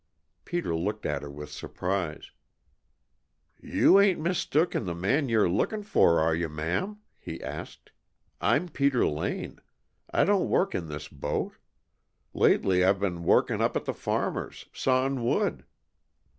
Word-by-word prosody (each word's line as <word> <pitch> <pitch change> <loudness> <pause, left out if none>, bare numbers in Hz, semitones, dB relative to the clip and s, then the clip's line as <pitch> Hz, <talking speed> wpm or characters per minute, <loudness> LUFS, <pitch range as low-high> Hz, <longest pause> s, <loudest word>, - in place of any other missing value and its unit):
Peter 175 - -2
looked 105 +6 -3
at 75 - -1
her 70 - -7
with 75 +1 -9
surprise. 90 -4 -4 1.3
"You 195 - +5
ain't 200 -4 +4
mistook 170 0 +1
in - - -1
the 85 -2 -3
man 130 - +1
you're 110 -4 +3
lookin' 205 - 0
for, 195 - +4
are 80 +1 +2
you, 85 0 -1
ma'am?" 85 - -2 0.2
He - - -7
asked. - - -8 0.5
"I'm 180 - +2
Peter 140 -5 +1
Lane. 75 - -3 0.5
I - - +2
don't 200 -2 +2
work 195 +1 +2
in 85 - -3
this 75 0 -6
boat. 75 0 -3 0.8
Lately 90 -1 +3
I've 95 +1 +3
been 90 -4 -2
workin' - - +3
up - - +1
at - - -5
the - - -2
farmer's, - - -3
sawin' 130 0 +1
wood." 115 - 0
100 Hz, 145 wpm, -28 LUFS, -, 1.3 s, You